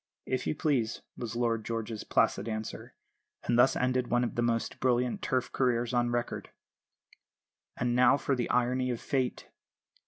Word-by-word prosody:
"If 130 -1 -2
you - - 0
please," 130 -7 0
was 115 -2 -5
Lord 115 -2 0
George's 115 -1 -4
placid 100 +4 +1
answer; 110 0 -5 0.5
and 120 - +1
thus 125 +2 +5
ended 125 0 +1
one 120 0 +2
of 120 - -2
the 120 - -1
most 115 -1 -1
brilliant 125 -1 +1
Turf 130 -1 -1
careers 120 -1 +1
on 120 -1 +2
record. 120 0 -2 1.3
And 120 0 0
now 125 +2 +6
for 140 - 0
the 120 -2 -2
irony 125 +1 +1
of 120 -2 -2
Fate! 130 -3 -2
120 Hz, 160 wpm, -30 LUFS, 115-125 Hz, 1.3 s, now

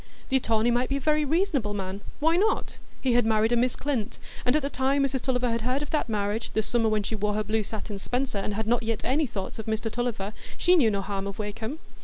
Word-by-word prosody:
The 265 - +4
attorney 230 -1 +2
might 245 +1 +1
be 275 - +1
a - - -2
very 305 +2 +2
reasonable 290 - +1
man; 195 0 -4 0.2
why 320 +3 +3
not? 420 +5 +1 0.2
He 255 -2 +2
had 245 0 +4
married 220 0 +2
a - - +4
Miss 245 +1 +2
Clint, 260 -7 -2 0.3
and 250 +3 +3
at 305 - +2
the - - +1
time 270 +2 +2
Mrs 270 -2 0
Tulliver 250 -2 +1
had 230 0 0
heard 255 +5 0
of 295 - -8
that 300 -5 0
marriage, 210 +1 -1
the 220 - +1
summer 230 -1 +2
when 215 -1 +1
she 210 - -3
wore 210 -1 0
her 215 - 0
blue 215 +2 0
satin 210 -1 -5
spencer, 250 0 -1
and 200 +1 -2
had 220 +1 -1
not 240 +2 +2
yet 225 -1 -2
any 285 +4 +2
thoughts 200 -2 -5
of 220 - -6
Mr 220 0 -1
Tulliver, 225 -4 -2 0.2
she 360 0 +5
knew 265 -10 +5
no 200 -2 0
harm 195 0 -3
of 200 - -5
Wakem. 220 +6 -4
230 Hz, 255 wpm, -27 LUFS, 215-265 Hz, 0.3 s, she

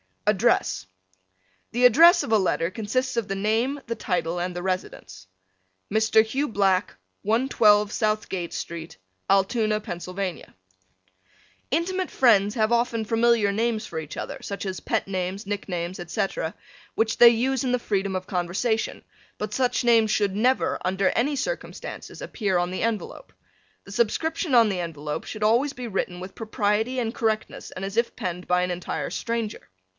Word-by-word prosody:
ADDRESS 210 - +2 0.9
The 245 +2 +3
address 335 - +7
of - - -5
a 220 - +6
letter 180 -3 0
consists 240 +6 -2
of 230 -3 0
the 195 - -2
name, 225 +8 0
the 230 - -3
title 175 -4 -1
and 180 0 -3
the 175 - -4
residence. 95 - -4 0.7
Mr. 220 0 +4
Hugh 270 +7 -1
Black, 195 -4 +1 0.3
112 215 -2 +3
Southgate 215 -6 -1
Street, 165 -1 -6 0.3
Altoona, 215 +2 +2
Pa. 175 - -5 1.7
Intimate 365 +5 0
friends 210 -5 +4
have 220 -1 +1
often 235 -1 +1
familiar 225 -1 +3
names 220 +1 0
for 160 - -5
each 155 -1 -7
other, - - -5
such 200 0 -5
as 190 -1 -3
pet - - -1
names, 190 +1 -3
nicknames, 185 -3 -4
etc., 175 -1 -2 0.4
which 220 0 +1
they 240 - +10
use 255 +3 +1
in 250 - 0
the - - +4
freedom 200 -4 -1
of 185 0 -3
conversation, 190 +5 -1 0.3
but 210 0 -4
such 250 +1 +1
names 230 -2 +4
should 205 -2 +1
never, 250 +5 +2
under 190 +1 +2
any 285 +5 +1
circumstances, - - -5
appear 200 -5 -1
on 175 0 0
the 185 - -3
envelope. 230 - -3 0.5
The 195 - -12
subscription 275 - 0
on 230 -2 +6
the 190 -3 -2
envelope 150 -3 -4
should 215 - -7
be - - +2
always 255 +6 +2
written 195 -7 -3
with 185 +1 -8
propriety 220 +2 0
and 230 -2 -2
correctness 220 -2 -2
and 185 - -7
as 195 +3 -6
if 235 0 +1
penned 180 -5 -4
by 180 0 +2
an 180 - -1
entire 175 0 -3
stranger. 230 -2 -3
215 Hz, 160 wpm, -25 LUFS, 185-235 Hz, 1.7 s, they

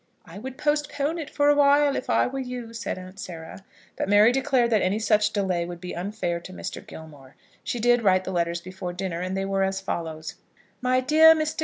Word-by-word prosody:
"I 180 +3 -10
would 260 +3 -8
postpone 295 +1 -1
it 305 -2 -6
for 290 -1 +1
awhile, 285 0 +4
if - - -4
I - - +3
were 270 +2 -4
you," 250 -3 -6
said 230 -4 -4
Aunt 185 +1 -11
Sarah. 170 0 -8 0.3
But - - -3
Mary 205 +3 +6
declared 260 -2 +1
that 215 -3 +3
any 190 +3 +1
such 210 -1 +2
delay 190 -4 0
would 175 0 -7
be 180 +1 -7
unfair 175 -2 -3
to 180 - -11
Mr. 185 - -7
Gilmore. 145 -4 -13 0.3
She 240 - -3
did 240 +1 +3
write 185 -3 +3
the 190 - -5
letters 170 -1 -1
before 185 0 -7
dinner, 180 -2 -4
and 185 +1 -3
they 195 - -1
were 195 0 -1
as 190 0 -1
follows: 160 -4 -5 0.4
MY 255 0 +2
DEAR 315 +4 +7
MR. 310 0 -1
205 Hz, 210 wpm, -25 LUFS, 180-260 Hz, 0.4 s, DEAR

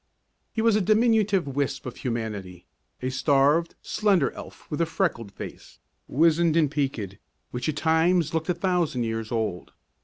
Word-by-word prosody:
He 220 - -1
was 230 -2 +4
a 215 - +3
diminutive 215 -3 +3
wisp 135 -1 -2
of 125 - -6
humanity, 105 -7 -4 0.4
a 130 - -1
starved, 145 +5 +2
slender 195 -9 +2
elf - - -11
with 150 - -1
a 165 - +2
freckled 155 - -1
face, - - -10 0.3
wizened 165 +2 +3
and 150 -4 +3
peaked, 125 -10 -2 0.3
which 125 +4 -2
at 150 - -2
times 160 0 +2
looked 160 +1 -1
a 180 - +2
thousand 175 -8 0
years 115 -1 -3
old. 110 -7 -2
150 Hz, 155 wpm, -26 LUFS, 125-175 Hz, 0.4 s, was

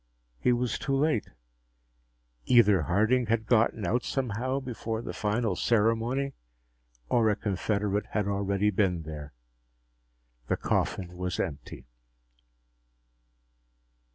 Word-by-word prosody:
He 125 - +3
was 120 0 0
too 135 - -1
late. 145 -6 +1 1.2
Either 105 -7 +5
Harding 110 - +2
had 110 0 +1
gotten 110 -3 +2
out 120 +7 +1
somehow 130 +1 -1
before 115 -3 -4
the - - -5
final 105 -1 0
ceremony 115 +6 +1 0.7
or 110 - +3
a 105 - +2
confederate 105 0 -1
had 105 -2 -1
already 100 +1 +1
been 90 -4 +1
here. 75 -2 -8 1.2
The - - 0
coffin 90 -1 -1
was 90 0 -3
empty. 80 -7 -5
110 Hz, 105 wpm, -28 LUFS, 100-120 Hz, 1.2 s, Either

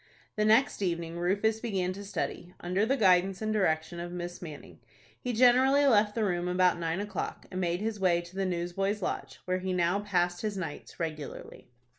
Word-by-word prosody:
The 215 - +1
next 220 +2 +4
evening, 170 -2 -2
Rufus 205 +5 +1
began 190 -6 -1
to 200 +2 -8
study, 180 -2 -4
under 185 +5 0
the 270 +3 +2
guidance 185 -3 +4
and 215 0 -1
direction 170 -4 0
of 175 0 -5
Miss 175 0 -6
Manning. 155 -5 -10 0.4
He 250 - -3
generally 255 +4 +5
left 210 -5 +4
the 225 - +1
room 175 -3 0
about 180 -1 +3
nine 165 +1 -1
o'clock, 205 -2 -4
and 185 - -3
made 175 +1 0
his 215 -1 -2
way 180 -3 +3
to 175 +2 -14
the 195 -1 0
Newsboys' 185 +3 -1
Lodge, - - -4
where 185 0 0
he 185 0 -2
now 180 +2 +2
passed 175 -4 0
his 210 -2 -2
nights 165 -6 -6
regularly. 155 -4 -6
185 Hz, 190 wpm, -29 LUFS, 175-210 Hz, 0.4 s, generally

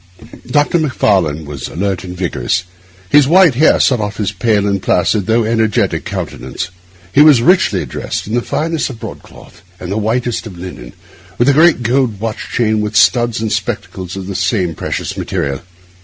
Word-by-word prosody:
Dr. 145 +6 +2
Macfarlane 95 - +1
was 70 -3 -6
alert 95 +1 -3
and 90 -1 -8
vigorous. 90 -1 -1 0.5
His 145 -2 +6
white 175 -1 +5
hair 150 +6 +4
set 125 -3 +3
off 105 -1 -3
his 100 -2 -1
pale 105 0 +1
and 100 -2 0
placid, 100 +4 +1
although 115 0 +2
energetic, 110 -2 0
countenance. 90 - -5 0.4
He 145 - +6
was 145 -6 +6
richly 180 +5 +3
dressed - - -4
in 105 - -6
the 120 - +2
finest 160 +4 -2
of 120 -4 -9
broadcloth 110 -2 -11 0.2
and 90 - -6
the 105 - -1
whitest 115 +2 -1
of 95 -4 -10
linen, 85 -9 -9 0.4
with 120 +3 +3
a - - +5
great 155 -3 +4
gold 120 -3 +1
watch 110 0 -4
chain, 110 -2 +1
and 105 +1 -4
studs 120 0 +3
and 110 -2 -2
spectacles 95 -1 -4
of 95 -1 -6
the 100 - -5
same 95 -2 0
precious - - -4
material. 70 -1 -3
110 Hz, 175 wpm, -15 LUFS, 95-125 Hz, 0.5 s, His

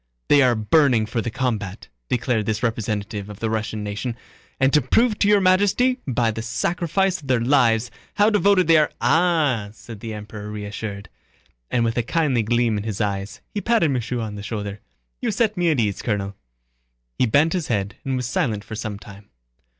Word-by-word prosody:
They 145 - +6
are 125 -2 +4
burning 115 +1 +3
for 115 +1 -2
the 120 - -3
combat," 110 -5 -3 0.2
declared 120 -3 0
this 110 +1 -1
representative 105 -3 -2
of 105 - -9
the 110 -1 -1
Russian 110 -1 -2
nation, 105 +4 -4 0.4
"and 130 0 +3
to 150 - +5
prove 215 - +2
to 205 - +3
Your 205 0 +5
Majesty 205 +7 +3
by 120 -3 +1
the 115 - -5
sacrifice 175 - 0
of 140 - -12
their 130 -2 +2
lives 120 -2 +2 0.2
how 210 +2 +4
devoted 200 -2 +4
they 165 0 +6
are...." 150 - +3
"Ah!" 155 -10 +2
said 110 -1 -11
the 110 0 -6
Emperor 105 0 -8
reassured, 105 -1 -6 0.6
and 120 -1 +1
with 115 0 -1
a - - +3
kindly 135 -1 +1
gleam 115 -1 +1
in - - -5
his 105 -3 -4
eyes, 100 -2 -3
he 205 - -2
patted 225 -11 +2
Michaud 120 -1 -2
on 110 -2 -4
the 105 - -7
shoulder. 105 -1 -5 0.4
"You - - 0
set 220 -2 +1
me 175 -2 +1
at 150 -5 +1
ease, 105 -4 0
Colonel." 100 -3 -2 0.8
He 125 - +3
bent 145 +8 +3
his 175 -5 -2
head 100 -3 -2
and 135 -1 -2
was 125 -1 -2
silent 110 -3 -1
for 110 - -10
some 110 -2 -4
time. 100 0 -14
115 Hz, 195 wpm, -22 LUFS, 105-150 Hz, 0.8 s, They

